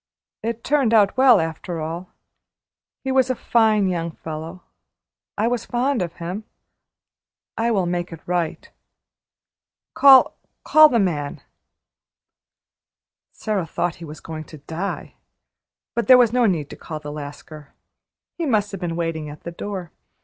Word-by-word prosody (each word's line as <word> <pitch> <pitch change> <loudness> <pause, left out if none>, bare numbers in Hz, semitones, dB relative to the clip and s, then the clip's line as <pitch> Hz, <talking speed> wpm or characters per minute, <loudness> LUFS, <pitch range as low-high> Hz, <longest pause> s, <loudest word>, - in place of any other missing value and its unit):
It 230 0 -4
turned 270 -5 +2
out 205 -2 +4
well 255 -4 +6
after 165 +1 -4
all. 165 +3 -5 0.9
He 265 - -2
was 260 -1 +3
a 255 - +1
fine 220 -4 +2
young 170 -2 -2
fellow. 160 +2 -8 0.7
I 220 - +1
was 240 -1 -2
fond 250 0 0
of 170 -2 -3
him. 180 +6 -6 1.1
I 230 +1 0
will 200 -6 +1
make 175 0 -2
it 165 - -8
right. 175 -2 -2 1.3
Call 270 -2 +7 0.3
call 310 0 +7
the 240 - +2
man." 155 -9 -1 1.9
Sara 205 -6 -3
thought 175 0 -2
he 170 - -9
was 150 0 -10
going 155 -1 -7
to 155 - -12
die. 165 +7 -5 0.8
But 235 - -1
there 255 -1 +9
was 240 -2 +4
no 245 -2 +4
need 160 -7 -1
to - - -7
call 155 -1 -7
the 150 -1 -7
Lascar. 145 0 -10 0.6
He 330 - -1
must 210 -5 +1
have 195 -2 -7
been 170 -2 -3
waiting 165 -3 -3
at 145 0 -11
the 170 - -6
door. 185 -1 -6
180 Hz, 150 wpm, -22 LUFS, 165-230 Hz, 1.9 s, there